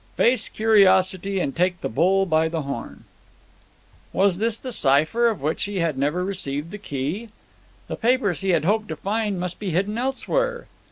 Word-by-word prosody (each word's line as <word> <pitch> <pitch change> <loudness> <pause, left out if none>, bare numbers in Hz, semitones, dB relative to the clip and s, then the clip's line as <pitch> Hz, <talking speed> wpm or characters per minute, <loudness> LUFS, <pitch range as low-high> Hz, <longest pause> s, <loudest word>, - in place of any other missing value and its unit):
Face 240 -2 +3
curiosity 195 -3 +3
and 135 - -2
take 180 0 0
the - - -2
bull 185 +10 +2
by 160 -2 +2
the 160 -2 -3
horn." 140 0 -7 1.1
Was 195 -2 +2
this 225 0 +1
the 255 - -6
cipher, 155 - +3
of 215 -11 -5
which 155 +2 -1
he 205 0 -6
had 165 -4 0
never 145 +7 -1
received 160 -5 -3
the 210 - -7
key? 165 - -4 0.6
The - - -4
papers 235 -7 +1
he 195 - -1
had 175 - +2
hoped 215 +3 +1
to 160 - -5
find 205 +2 -2
must 180 0 -4
be 205 - -3
hidden 195 +6 -1
elsewhere. 485 - -1
190 Hz, 175 wpm, -23 LUFS, 165-215 Hz, 1.1 s, Face